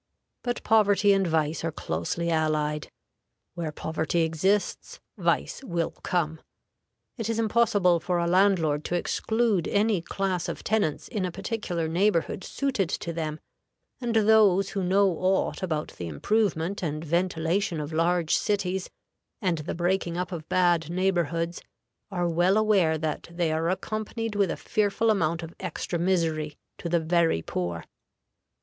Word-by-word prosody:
But 245 -1 -3
poverty 205 -2 +4
and 195 -1 +2
vice 160 -1 0
are 165 - -1
closely 150 - -2
allied; 155 -1 0 0.6
where 165 -3 -3
poverty 160 +2 -1
exists, 175 +6 0 0.2
vice - - 0
will 170 -9 -1
come. 160 -3 -1 0.8
It 225 -1 -2
is 225 - 0
impossible 210 -6 +3
for 175 +1 -1
a 170 - +1
landlord 170 -5 +3
to 175 - -1
exclude 220 +1 0
any 205 -3 +2
class 185 0 -2
of - - -6
tenants 205 -9 0
in 210 -5 -3
a 180 - -1
particular 195 -4 -3
neighborhood 185 +2 +1
suited 260 - -1
to 170 - -3
them, 155 -1 -3 0.6
and 240 -2 -2
those 210 -3 +5
who 195 - -2
know 195 +2 +4
aught 190 +2 +1
about 160 -5 -2
the 85 - -7
improvement 190 - 0
and 155 -2 -3
ventilation 170 +2 0
of 150 +1 -5
large 170 0 +2
cities, 190 -2 -1 0.5
and 180 -5 0
the 150 +4 -4
breaking 175 0 0
up 180 +1 -2
of 160 -3 -6
bad 175 -3 +2
neighborhoods, 170 -2 0 0.5
are 175 -3 -1
well 175 +4 +3
aware 195 -7 +3
that 155 -1 -3
they 170 -2 0
are 160 +1 0
accompanied 215 +4 -3
with 200 -3 +2
a - - -2
fearful 215 +2 +1
amount 170 -4 0
of 165 +1 -8
extra 175 -1 -3
misery 165 -4 0 0.2
to 170 - -4
the 170 0 +3
very 165 - +2
poor. 85 -2 -3
175 Hz, 145 wpm, -27 LUFS, 160-200 Hz, 0.8 s, those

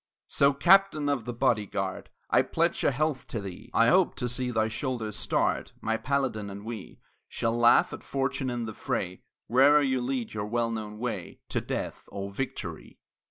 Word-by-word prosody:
So, 140 0 +4
Captain 175 +1 +4
of 135 -6 -1
the 120 - -3
Body 120 -4 +1
Guard, 95 -1 -4 0.2
I - - +6
pledge - - 0
a - - +5
health 145 0 -1
to 115 - -3
thee! 100 +3 -8
I 115 0 +4
hope 185 -1 +4
to 125 - -2
see 125 +1 -2
thy 110 -2 +1
shoulders 110 -2 -3
starred, - - 0
My 110 0 0
Paladin; 130 -5 -1
and 100 +1 -8
we 110 -4 -7 0.3
Shall 115 0 -1
laugh 120 0 +5
at - - -7
fortune 135 -1 -2
in 120 -1 -2
the 110 - -5
fray 90 -2 -3 0.3
Whene'er 140 +5 +6
you 130 -2 +1
lead 125 -2 -2
your 105 -1 -3
well 115 +1 0
known 105 -2 -5
way 125 +1 -5
To - - -1
death - - -4
or 100 0 -5
victory! 135 +7 -5
120 Hz, 185 wpm, -28 LUFS, 110-135 Hz, 0.3 s, I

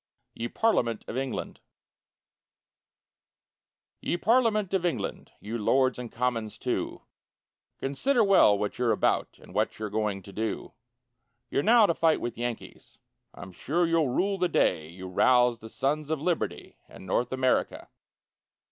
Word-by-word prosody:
YE 115 - -4
PARLIAMENT 120 - 0
OF - - -6
ENGLAND 130 -1 -4 2.4
Ye 175 - -1
parliament 215 -2 +2
of 190 -2 +1
England, 175 -2 -3
You 115 +3 -5
lords 130 +4 +2
and 120 -2 -7
commons, 115 -3 -2
too, - - -3 0.7
Consider 230 - +1
well 190 - +5
what 105 +3 -3
you're 120 -2 +2
about, - - 0
And - - -16
what - - 0
you're 105 -1 -5
going 105 -3 -2
to 100 - -12
do; 110 +2 -4 0.8
You're - - +1
now 225 +5 +6
to 170 - +2
fight 160 -1 +2
with 120 -1 -4
Yankees, 120 -1 -6 0.4
I'm 90 +2 -10
sure 160 - 0
you'll 165 -4 +2
rue 195 +10 0
the 180 0 +1
day 80 - +1
You 95 +2 -9
roused 120 +5 +3
the 110 - -9
sons 145 +5 -1
of 160 -2 -1
liberty, 170 +2 -3
In - - -12
North 120 +6 0
America. 130 -1 0
125 Hz, 145 wpm, -27 LUFS, 110-170 Hz, 2.4 s, now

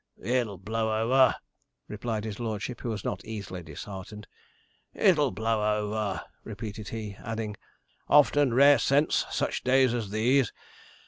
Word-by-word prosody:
'It'll 115 -2 -1
blow 110 +3 -1
over,' 130 +3 +4 0.5
replied 110 0 -3
his 110 -1 -6
lordship, 115 +1 -4
who 120 - -3
was 110 -2 -4
not - - -3
easily 100 -5 -6
disheartened. 95 +6 -9 0.7
'It'll 155 -8 +4
blow 110 -2 0
over,' 105 -2 -2 0.2
repeated 110 -1 -7
he, 110 -3 -6
adding, 110 -2 -4 0.5
'often 145 -2 +5
rare 140 +2 +6
scents 140 +5 +2
such - - -2
days 130 -1 +4
as 115 -5 -3
these. 120 +4 +2
110 Hz, 130 wpm, -28 LUFS, 105-125 Hz, 0.7 s, rare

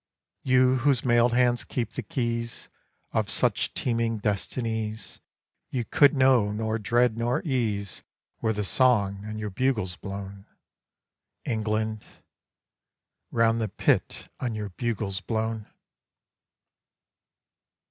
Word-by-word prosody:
You 130 0 +4
whose 130 -1 +2
mailed 120 0 +4
hand 120 -1 +2
keeps 115 -2 -3
the - - 0
keys 115 -2 -3 0.4
Of - - 0
such - - +1
teeming 115 -2 0
destinies, 110 +1 -3 0.5
You 125 -3 -2
could 145 +5 +5
know 130 -6 +4
nor 110 +1 -2
dread 120 +2 +2
nor 120 +1 0
ease 110 - -1 0.4
Were 110 - +1
the 105 -1 -2
Song 100 -3 +2
on 110 0 -5
your 105 -1 -4
bugles 110 -5 0
blown, 100 0 -7 1.0
England 110 -1 -1 1.3
Round 115 0 +2
the 110 - -1
Pit - - 0
on 120 -3 -2
your 105 -1 -4
bugles 100 -1 -2
blown! 110 0 -2
115 Hz, 110 wpm, -26 LUFS, 105-120 Hz, 1.3 s, could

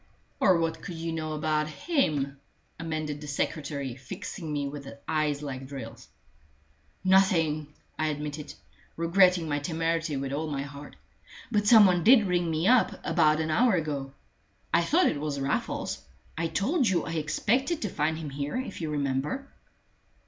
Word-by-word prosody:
"Or 185 -3 +5
what 165 -1 -1
could 175 - -6
you 165 0 -3
know 155 -1 -3
about 155 0 0
him?" 150 - 0 0.4
amended 155 -2 -3
the 150 - -7
secretary, 140 -2 -2
fixing 150 - -7
me 145 -1 -1
with 140 -1 -7 0.2
eyes 150 -2 0
like 135 -2 -5
drills. 135 -1 -8 1.0
"Nothing," 170 -6 +3 0.3
I 155 - +1
admitted, 150 0 -4 0.4
regretting 175 0 +4
my 145 -1 0
temerity 165 0 -1
with 135 0 -3
all 155 +2 -2
my 140 -2 -2
heart. 140 +1 -10 0.6
"But 210 -2 +1
some 220 -2 +9
one 180 -3 +3
did 230 0 +7
ring 175 -2 +1
me 160 +3 0
up 250 0 +4
about 155 -2 +3
an 160 0 -1
hour 225 +5 +4
ago. 145 -5 -2 0.6
I 170 - +5
thought 330 - +3
it - - +1
was 150 -2 -2
Raffles. 135 +1 -2 0.3
I 165 +1 -1
told 235 - +1
you 175 -4 +1
I - - -4
expected 230 - 0
to 210 - -1
find 155 -1 0
him 155 -3 -6
here, 140 - -3
if 255 -8 -5
you 160 - -2
remember." 145 - -2
155 Hz, 160 wpm, -28 LUFS, 145-180 Hz, 1.0 s, some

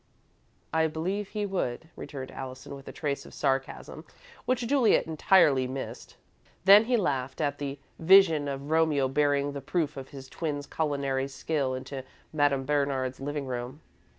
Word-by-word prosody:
"I 160 0 +3
believe 185 +6 -3
he 210 0 -3
would," 160 -7 -3
returned 130 -3 -7
Allison, 130 +1 -8
with 135 0 -11
a - - -6
trace 145 -3 -3
of - - -13
sarcasm 135 -2 -2 0.4
which 250 -1 0
Juliet 255 -2 +3
entirely 155 -4 +4
missed. 130 +1 -7 0.5
Then 200 +3 +9
he 245 +1 +2
laughed 135 - -1
at 145 -2 -1
the 140 -1 -4 0.2
vision 165 -4 +6
of 140 +1 -5
Romeo 160 -4 +3
bearing 145 +1 +1
the 140 0 -6
proof 150 +1 -1
of 135 -1 -7
his 135 -2 -10
twin's 145 0 -4
culinary 140 -4 -1
skill 135 -1 -2
into 130 +1 -6 0.3
Madame 145 -3 +2
Bernard's 140 -3 0
living 145 +1 -3
room. 125 +3 -5
145 Hz, 150 wpm, -28 LUFS, 135-160 Hz, 0.5 s, Then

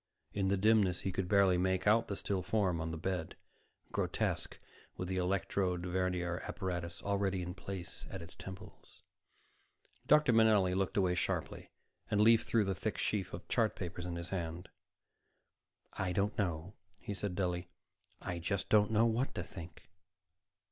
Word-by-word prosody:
In 100 -1 0
the 100 +1 +2
dimness, 100 -3 +3
he 95 - -1
could 90 0 -2
barely 100 -3 +5
make 95 0 +1
out 110 +2 +4
the 100 - -3
still 95 -1 -1
form 90 -4 +1
on 80 - -2
the 80 - -4
bed, 90 0 -3 0.6
grotesque - - -1 0.4
with 90 - -3
the 95 0 -2
electrode 90 -1 0
vernier 90 -1 -1
apparatus 85 -2 -4
already 100 -2 0
in 90 0 -5
place 95 -1 -7
at 95 - -6
its 85 0 -10
temples. 95 0 -11 1.0
Dr. 150 -4 +6
Manelli 110 -5 +5
looked 95 +1 0
away 95 -2 +3
sharply, 90 - -2 0.4
and 105 - +1
leafed 115 +2 +5
through 115 -2 +3
the 95 - 0
thick 90 - -3
sheaf 100 -4 -1
of - - -8
chart - - +2
papers 90 0 -5
in 85 - -3
his 85 +1 -5
hand. 85 -1 -4 1.2
"I 90 -1 -1
don't 100 +3 +1
know," 90 -1 -2 0.2
he 105 - -5
said 100 -2 -3
dully. 90 -1 -1 0.5
"I 85 - -4
just 100 +3 -2
don't 105 -1 +5
know 110 +1 +4
what 115 +4 0
to - - -2
think." 85 -4 -10
95 Hz, 160 wpm, -34 LUFS, 90-100 Hz, 1.2 s, Dr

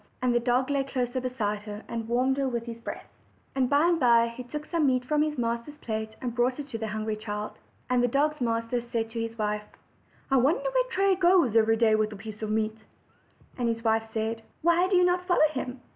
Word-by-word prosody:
And 250 -1 +3
the 240 - +3
dog 250 +3 +1
lay 280 -1 +1
close 250 -3 -2
beside 245 -5 -2
her, 210 0 -8
and 230 -1 -4
warmed 255 +3 +1
her 275 -1 +1
with 235 -2 -3
his 230 -1 -7
breath. 230 - -7 0.5
And 260 -2 +1
by 285 +1 +4
and 340 -1 +3
by 235 -3 +5
he 250 - -6
took 300 +5 -6
some 330 -4 +1
meat 255 -1 +1
from 300 +3 +1
his 300 -1 0
master's 235 +4 -2
plate, 220 -4 -4
and 245 -2 -3
brought 245 +1 +1
it 290 - -4
to 225 - -5
the 220 - -3
hungry 215 0 -2
child. 210 0 -5 0.4
And 250 -1 +2
the 245 - +3
dog's 295 +3 +1
master 230 0 0
said 230 -1 -3
to 230 - -4
his 230 0 -5
wife: 210 -1 -1 0.7
"I 270 - +5
wonder 305 - +2
where - - +1
Tray 395 -3 +3
goes 350 - +4
every 225 0 +4
day 220 -1 +4
with 215 0 +2
a - - -7
piece 210 +1 -9
of 215 - -3
meat?" 220 0 -1 0.8
And 240 -1 +1
his 230 0 -2
wife 225 -1 +1
said: 225 +1 -2 0.2
"Why 340 +2 +4
do 380 - +1
you 360 0 +5
not 360 0 +1
follow 350 -4 +5
him?" 255 -2 -5
240 Hz, 235 wpm, -27 LUFS, 225-280 Hz, 0.8 s, by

